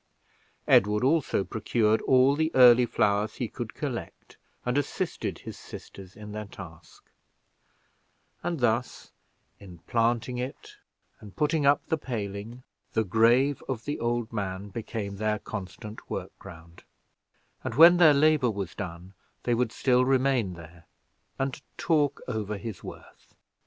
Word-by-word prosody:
Edward 105 +3 +4
also 140 -7 +2
procured 110 +1 +1
all 130 +2 +4
the 160 +1 +1
early 125 -1 +7
flowers 105 0 +1
he - - -3
could - - -7
collect, - - -6 0.3
and 125 0 0
assisted 145 -1 -2
his - - -10
sisters 95 -1 -11
in 105 -1 -10
their 105 0 -6
task; 85 -5 -13 1.3
and 170 -5 -3
thus, 120 +1 -1 0.5
in 95 -4 -12
planting 120 +1 0
it, 125 +2 -7 0.4
and 105 -2 -13
putting 150 -1 +1
up 140 0 +3
the 160 - -1
paling, 110 -1 -5 0.3
the 110 - +2
grave 120 +7 +3
of 115 -4 -4
the 145 - -3
old 120 -1 -2
man 100 -1 -4
became 105 -2 -5
the 105 0 0
constant 105 +1 -8
work - - -4
ground; 85 -3 -13 0.8
and 115 - -4
when 170 +4 +8
their 160 -4 +7
labor 150 -3 +4
was 100 -6 -4
done, 90 0 -7 0.3
they 120 - +1
would 120 -1 0
still 125 0 +2
remain 130 -7 +1
there 85 0 -14 0.5
and 135 0 -3 0.2
talk 150 -4 +1
over 105 -4 -3
his 110 -2 -7
worth. - - -12
115 Hz, 135 wpm, -27 LUFS, 100-130 Hz, 1.3 s, when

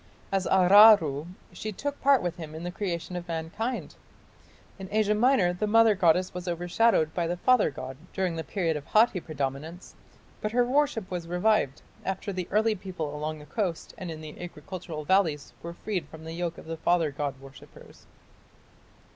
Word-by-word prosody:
As 195 -1 0
Aruru 185 -6 +6 0.3
she 215 - -5
took 285 +8 -5
part 275 -4 +4
with 175 0 -3
him 155 -2 -8
in 160 - -7
the 175 - -4
creation 180 -2 -4
of 175 0 -5
mankind. 175 +10 -4 0.9
In 190 -1 -7
Asia 210 0 +2
Minor 210 -5 +3
the 210 +4 -2
mother 225 0 +5
goddess 180 -1 +2
was 180 0 -6
overshadowed 175 0 +2
by 170 -2 -1
the 175 +1 -2
father 250 +2 +4
god 130 -2 -8
during 185 -3 -1
the 160 - -3
period 170 -5 -1
of 150 - -4
Hatti 215 -3 +4
predominance, 155 +3 -5 0.5
but 215 +1 -2
her 245 0 +3
worship 260 -6 0
was 175 -2 -4
revived 180 -5 +1 0.2
after 195 +1 -3
the 180 -2 -4
early 220 +2 +2
people 180 -7 -5
along 155 +1 -3
the 150 - -12
coast 180 0 -3
and 185 - -7
in 160 -1 -7
the 155 +1 -10
agricultural 175 -3 -7
valleys 160 -6 +1
were 170 0 -7
freed 195 -3 -3
from 160 0 -12
the 160 0 -7
yoke 170 -1 -3
of - - -11
the 165 0 -5
father 165 -2 +2
god 140 -1 -4
worshippers. 135 -2 -15
175 Hz, 180 wpm, -27 LUFS, 160-210 Hz, 0.9 s, Aruru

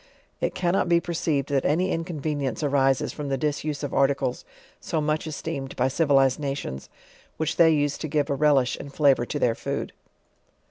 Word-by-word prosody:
It - - -2
cannot 175 0 +1
be 170 0 +5
perceived 160 -5 -1
that 140 -2 +1
any 180 +6 +1
inconvenience 155 -4 -3
arises 135 -2 +2
.from 145 -2 -5
the 135 - 0
disuse 150 +1 -2
of 145 - -4
articles 135 -2 +1 0.4
so 160 - -2
much 155 +1 -1
esteemed 145 -3 -5
by 130 +1 +1
civilized 135 -2 +3
nations, 135 - -4 0.5
which 160 - -2
they 165 -1 +7
use 145 -2 +1
to 155 - -3
give 145 -1 0
a 145 - 0
relish 140 -3 +3
and 140 - -9
flavor 135 -4 +3
to - - -3
their 120 - +2
food. - - -4
145 Hz, 175 wpm, -25 LUFS, 135-155 Hz, 0.5 s, they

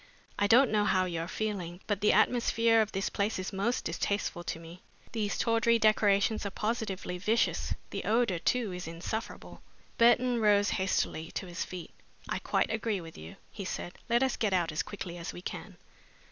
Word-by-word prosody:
I 205 - +3
don't 240 +4 +6
know 210 -1 +3
how 185 -3 +3
you 170 -2 -3
are 165 - -4
feeling, 185 -4 -3
but 205 -2 -1
the 210 - +5
atmosphere 230 -2 +3
of 215 - -1
this 195 0 -1
place 205 +2 -1
is 185 +2 -4
most 205 +6 -1
distasteful 175 +1 -2
to - - -3
me. 165 +2 -12 0.3
These 210 -3 -1
tawdry 230 0 +3
decorations 215 -1 +3
are 200 - -2
positively 200 -4 -3
vicious. 220 +5 +1 0.2
The - - -4
odor, 220 -5 +2
too, 230 +2 0
is 180 -1 -6
insufferable." 170 +7 -6 0.4
Burton 240 +1 +4
rose 205 -1 +4
hastily 175 -3 -1
to - - -3
his 175 -1 -4
feet. 180 -2 -8 0.4
"I - - -2
quite - - 0
agree 220 -2 -1
with 165 -2 -10
you," 80 +1 -10 0.2
he 200 - -6
said. 175 -1 -5 0.2
"Let 235 +2 +4
us 265 - 0
get 210 -4 0
out 175 -3 +1
as 155 - -1
quickly 180 -4 -7
as 170 - -5
we 175 - -9
can." - - -7
205 Hz, 190 wpm, -30 LUFS, 180-225 Hz, 0.4 s, don't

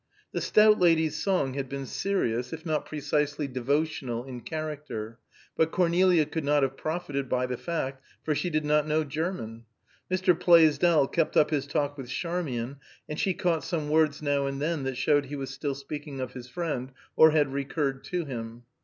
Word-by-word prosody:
The - - -2
stout 215 0 +5
lady's 160 -3 +3
song 180 -10 +1
had 135 -1 -4
been 140 0 -4
serious, 125 - -1
if 160 +1 -7
not 155 -2 -1
precisely 150 0 -1
devotional 130 -2 -1
in 125 -2 -7
character; 150 -8 -5 0.4
but 160 - +2
Cornelia 175 -1 +3
could 155 +1 -4
not 145 0 +3
have 135 0 0
profited 145 -4 -3
by 125 0 +1
the 125 0 -3
fact, 135 -3 -4 0.2
for 155 - 0
she 175 +4 -1
did 155 -2 0
not 150 0 +2
know 155 +1 +2
German. 145 -7 -4 0.4
Mr. 185 0 +3
Plaisdell 165 -3 +5
kept 165 +2 0
up 150 - +4
his 145 -2 0
talk 145 -1 -1
with 125 -2 -7
Charmian, 140 -6 -3 0.3
and 150 - -5
she 190 -2 +1
caught 170 -3 0
some 155 -4 -2
words 155 -1 +2
now 140 -1 +1
and 135 0 -3
then 155 +1 -1
that 135 -1 -3
showed 145 +2 +2
he 145 - -5
was 135 -1 -5
still 140 -3 -3
speaking 140 0 -7
of 130 -1 -4
his 125 -1 -9
friend, 135 -5 -3 0.2
or 160 - +8
had 150 -3 +2
recurred 140 -1 -2
to 175 -2 -2
him. 115 -3 -6
150 Hz, 185 wpm, -28 LUFS, 135-160 Hz, 0.4 s, or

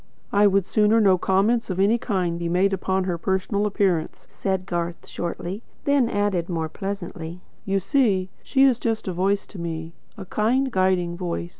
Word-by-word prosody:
"I 205 +1 +5
would 195 -2 +2
sooner 215 +2 +3
no 190 -4 +4
comments 210 +6 +2
of 185 0 -2
any 210 +5 +3
kind 180 -7 -1
were 170 - -1
made 190 +3 +2
upon 190 0 0
her 180 -2 -2
personal 190 +3 0
appearance," 190 -5 0
said 190 -1 -2
Garth 170 -2 -3
shortly; 175 +4 -4 0.2
then 280 -4 +3
added, 205 -4 0
more 165 -2 -2
pleasantly: 180 -3 -6 0.3
"You 195 0 +1
see, 195 -3 +1
she 270 -1 +2
is 260 -3 +4
just 225 -3 -2
a 185 - -1
voice 195 +3 +1
to 200 - -11
me 165 -1 -5 0.2
a 195 - -7
kind, 250 +8 +1
guiding 185 -3 +1
voice. 175 -1 -3
190 Hz, 175 wpm, -24 LUFS, 175-210 Hz, 0.3 s, I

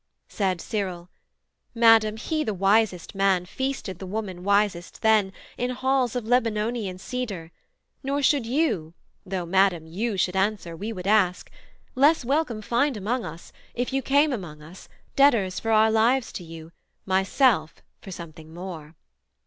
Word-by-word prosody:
Said 190 -4 -1
Cyril, 185 -4 -4 0.6
'Madam, 225 -2 +5
he 310 +7 -2
the 215 -6 -3
wisest 195 -1 +1
man 195 -2 +2
Feasted 265 -4 -4
the 190 - -7
woman 190 -3 -5
wisest 200 -2 0
then, 215 -3 +4 0.3
in 245 - 0
halls 260 -1 0
Of 245 -3 -2
Lebanonian 225 -4 0
cedar: 195 -6 -5 0.5
nor 280 +1 -2
should 270 -4 +2
you 230 - -1 0.3
(Though, 185 -2 -3
Madam, 185 -2 +2
you 200 +6 -3
should 180 0 0
answer, 190 -3 -1
we 210 +7 -5
would 185 -4 -7
ask) 195 -3 +2 0.4
Less 285 +1 +3
welcome 265 -5 -1
find 245 +3 +1
among 225 +5 -2
us, 165 +2 -10 0.2
if 245 +2 -2
you 270 - +1
came 285 +3 +3
Among 175 -10 -6
us, 170 +5 -13 0.3
debtors 230 -10 +3
for 225 - -4
our 220 0 +4
lives 230 +3 +2
to 180 - -6
you, 165 -1 -11 0.3
Myself 190 - +1 0.2
for - - -11
something 160 -3 -10
more.' 170 -3 -8
210 Hz, 150 wpm, -25 LUFS, 180-245 Hz, 0.6 s, Madam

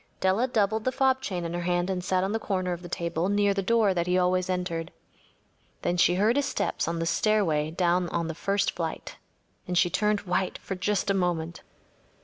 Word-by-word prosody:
Della 190 +7 +2
doubled 220 -3 +1
the 255 - +1
fob 265 0 +2
chain 180 -8 -3
in 170 - -4
her 175 - -2
hand 175 0 0
and 185 -2 -2
sat 185 0 +1
on 195 - -1
the 225 - -1
corner 185 -4 -1
of 175 - -7
the 175 - -9
table 170 0 -2
near 205 0 +2
the 195 - -1
door 215 0 +3
that 170 -1 -1
he 180 0 +2
always 185 0 +1
entered. 180 -2 -2 0.9
Then 175 - +1
she 175 0 +4
heard 215 +7 +2
his 285 -1 +1
step - - -2
on 170 0 -1
the 165 - -1
stair 215 +6 +2
away 155 -4 0
down 175 +1 +1
on 170 -1 -2
the 165 - -3
first 200 +5 0
flight, - - -5 0.5
and 180 -1 -1
she 175 -1 +3
turned 210 +1 +1
white 185 0 -1
for - - -6
just 195 +2 0
a - - +2
moment. 175 -3 -1
185 Hz, 220 wpm, -27 LUFS, 175-205 Hz, 0.9 s, she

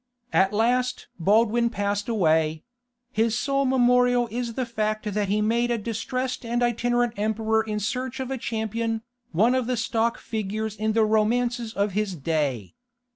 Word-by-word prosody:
At 190 0 +4
last 250 +4 0
Baldwin 225 +6 +3
passed 205 0 -2
away: 160 -7 +2 0.5
his 225 -1 +1
sole 275 +1 +1
memorial 245 -1 +3
is 235 0 -3
the 255 - -1
fact 215 -2 -2
that 205 0 0
he 210 +2 +1
made 235 +2 +1
a 240 - +1
distressed 250 +4 -3
and 240 +1 0
itinerant 240 0 +1
emperor 220 +1 +1
in 215 -1 -3
search 255 +5 -3
of 265 0 -4
a 265 - -1
champion, 225 0 -2 0.3
one 215 +9 +3
of 255 -2 0
the 250 -1 0
stock 230 0 0
figures 215 0 -3
in 215 0 -1
the 220 0 +4
Romances 230 +2 +1
of 200 +1 +1
his 205 -1 -1
day. 140 - -2
225 Hz, 160 wpm, -25 LUFS, 210-240 Hz, 0.5 s, At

